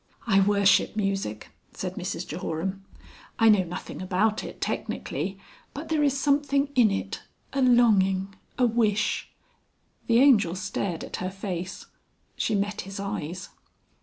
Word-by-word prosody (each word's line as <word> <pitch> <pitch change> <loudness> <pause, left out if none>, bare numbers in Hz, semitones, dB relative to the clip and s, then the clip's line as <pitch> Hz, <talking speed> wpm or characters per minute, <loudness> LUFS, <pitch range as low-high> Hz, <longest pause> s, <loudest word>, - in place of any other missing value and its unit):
"I 195 -4 +4
worship 200 +1 +4
music," 195 - -2 0.2
said - - -4
Mrs - - -4
Jehoram. 190 +5 -4 0.5
"I 225 -1 +5
know 210 -3 +6
nothing 175 +1 -7
about 210 +4 +1
it - - -8
technically, 195 0 -3 0.4
but 295 +3 -6
there 315 -2 +1
is 280 -2 +2
something 280 0 +2
in 245 -5 +5
it 195 - -3 0.3
a 275 - 0
longing, 200 -6 +4 0.2
a 250 - +4
wish...." 220 -3 +1 0.8
The 230 - +4
Angel 230 -10 +5
stared 190 -2 -3
at - - -6
her 185 - -3
face. 190 -2 -5 0.5
She 220 - 0
met 205 +1 -1
his 195 +1 -8
eyes. 190 -3 -4
200 Hz, 135 wpm, -26 LUFS, 190-235 Hz, 0.8 s, know